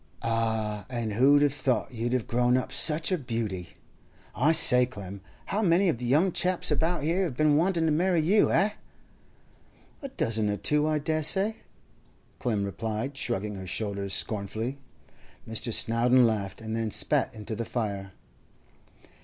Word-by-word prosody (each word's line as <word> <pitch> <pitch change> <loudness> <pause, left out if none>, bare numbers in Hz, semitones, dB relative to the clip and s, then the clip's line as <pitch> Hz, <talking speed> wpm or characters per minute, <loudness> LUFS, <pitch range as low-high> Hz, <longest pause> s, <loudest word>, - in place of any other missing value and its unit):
'Ah! 110 -2 -2
And 120 -4 -3
who'd 140 +6 +4
have 145 -2 +2
thought 130 -6 -1
you'd 120 +1 -3
have 125 -3 -1
grown 125 +1 +1
up 130 - -4
such 155 +3 +2
a 185 - 0
beauty! 110 - -5 0.6
I 140 +7 +2
say, 125 -5 +7
Clem, 100 -5 -9 0.2
how 210 - -2
many 180 -1 +3
of 120 - -2
the 125 - -5
young 155 +10 +2
chaps 180 -1 +1
about 165 +1 0
here 170 +5 0
have 135 -8 -5
been 155 -1 +3
wanting 170 +1 +1
to 160 - +1
marry 175 +3 +1
you, 190 +7 +3
eh?' 195 +5 +2 1.3
'A 275 - -6
dozen 115 - -1
or 105 - -2
two, 150 +5 +2
I 155 -1 +1
dessay,' 160 +8 +1 0.8
Clem 110 -5 -1
replied, 110 +6 -4
shrugging 105 -5 -2
her 95 -1 -8
shoulders 100 -1 -3
scornfully. 110 +5 -4 0.7
Mr. 115 +1 -1
Snowdon 120 +3 +3
laughed, 105 -3 -2
and 110 0 -5
then 115 -1 -2
spat 140 +5 +1
into 110 0 -6
the 115 - -3
fire. 100 -5 -4
125 Hz, 160 wpm, -27 LUFS, 110-155 Hz, 1.3 s, say